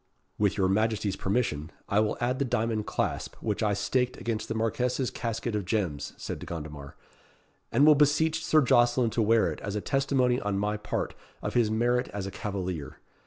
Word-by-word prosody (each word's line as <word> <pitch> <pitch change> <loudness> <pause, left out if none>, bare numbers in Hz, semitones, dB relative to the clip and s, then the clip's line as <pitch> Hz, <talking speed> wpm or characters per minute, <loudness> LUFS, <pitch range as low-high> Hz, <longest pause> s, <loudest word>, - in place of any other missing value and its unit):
"With 105 0 +2
your 95 -2 +3
Majesty's 105 0 +1
permission, 95 -8 -1 0.2
I 100 - +2
will 110 0 +1
add 125 +2 0
the - - +2
diamond 115 -4 -1
clasp - - -2
which 105 -1 -3
I 105 -2 +2
staked 125 +5 0
against 115 -2 -3
the 110 - -3
Marquess's 125 +3 0
casket 115 0 -3
of 105 -1 -1
gems," 90 -7 -2
said - - -5
De - - -9
Gondomar, 75 -4 -7 0.8
"and 145 - +5
will 155 - +9
beseech 155 +2 +2
Sir 155 -1 +4
Jocelyn 120 -1 +3
to 115 - 0
wear 110 +1 +3
it - - -7
as 100 - -4
a - - 0
testimony 130 -2 +1
on 100 -1 -1
my 105 +1 0
part 105 0 -3 0.3
of - - -2
his 120 -3 +3
merit 120 +3 +1
as 100 -1 -5
a 95 - -5
cavalier. 95 -9 -4
110 Hz, 190 wpm, -28 LUFS, 100-125 Hz, 0.8 s, will